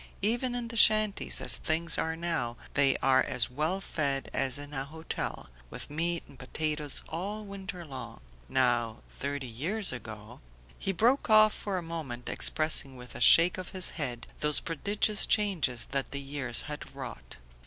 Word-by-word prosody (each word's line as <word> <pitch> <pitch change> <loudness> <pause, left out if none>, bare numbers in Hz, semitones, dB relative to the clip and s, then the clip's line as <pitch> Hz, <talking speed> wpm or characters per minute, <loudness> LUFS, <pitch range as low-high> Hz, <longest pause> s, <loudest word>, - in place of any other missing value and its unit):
Even 240 +4 0
in 240 -1 -4
the 230 - -5
shanties, 215 -1 +4
as - - 0
things 165 +1 0
are 160 0 -1
now, 165 -9 -3 0.2
they 140 -2 +3
are 130 0 +4
as 120 -1 -1
well 155 +8 -1
fed 140 -7 -2
as 135 0 +1
in 145 +1 -6
a 135 -1 -3
hotel, 160 - -6 0.2
with - - -7
meat 170 +2 -2
and 135 - -17
potatoes 150 +2 -1
all 205 +5 -5
winter 190 -3 -8
long. 135 - -9 0.3
Now, 120 -3 0 0.2
thirty 140 -1 -3
years 165 - +1
ago 110 -4 -9 0.2
..." - - -27
He 195 - -1
broke 235 +8 +1
off 215 0 +6
for 200 -2 -4
a 180 - -4
moment, 150 -8 -6
expressing 155 -3 +4
with 125 0 -11
a - - -8
shake 175 +2 +7
of 185 - -7
his 185 - -1
head 125 -7 -4
those 150 -1 +4
prodigious 200 +5 +2
changes 180 - +1
that 135 0 -1
the 140 - -4
years 135 -4 -2
had 150 -2 -8
wrought. 130 -5 -9
155 Hz, 170 wpm, -29 LUFS, 130-190 Hz, 0.3 s, shake